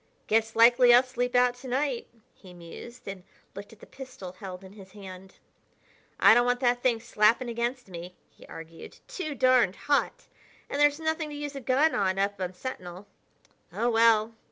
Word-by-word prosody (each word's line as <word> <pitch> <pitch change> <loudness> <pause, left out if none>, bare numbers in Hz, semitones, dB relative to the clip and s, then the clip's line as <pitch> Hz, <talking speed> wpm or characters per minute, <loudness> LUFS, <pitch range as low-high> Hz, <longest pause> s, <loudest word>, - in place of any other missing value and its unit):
"Guess 225 +1 0
likely 240 +2 +6
I'll 245 - +6
sleep 245 -1 -3
out 245 0 +4
to 260 +1 -11
night," 260 -1 -2 0.3
he 185 -2 -16
mused 175 +8 -12
and 195 -1 -7 0.3
looked 200 +1 -10
at 225 - -18
the - - -12
pistol 255 -9 -10
he 185 - -25
held 185 -1 -8
in 190 +1 -13
his 195 -2 -15
hand. 190 -2 -12 0.8
"I - - +7
don't 240 +1 +3
want 245 0 +1
that 245 -1 +1
thing 240 -3 +1
slapping 230 +1 +1
against 240 +1 -3
me," 180 0 -9 0.2
he - - -18
argued; 165 0 -11
"too 370 -12 -5
darned 255 -8 +3
hot! 290 +12 -1 0.5
And 285 - -1
there's 290 +1 +3
nothing 315 -1 -2
to 295 - -8
use 290 -1 -6
a 275 - -6
gun 265 +6 +2
on 190 -1 0
up 200 0 -1
on 185 0 -4
Sentinel.... 185 -5 -8 0.7
Oh, 240 +1 -1
well!" 225 -1 +3
235 Hz, 185 wpm, -27 LUFS, 195-255 Hz, 0.8 s, I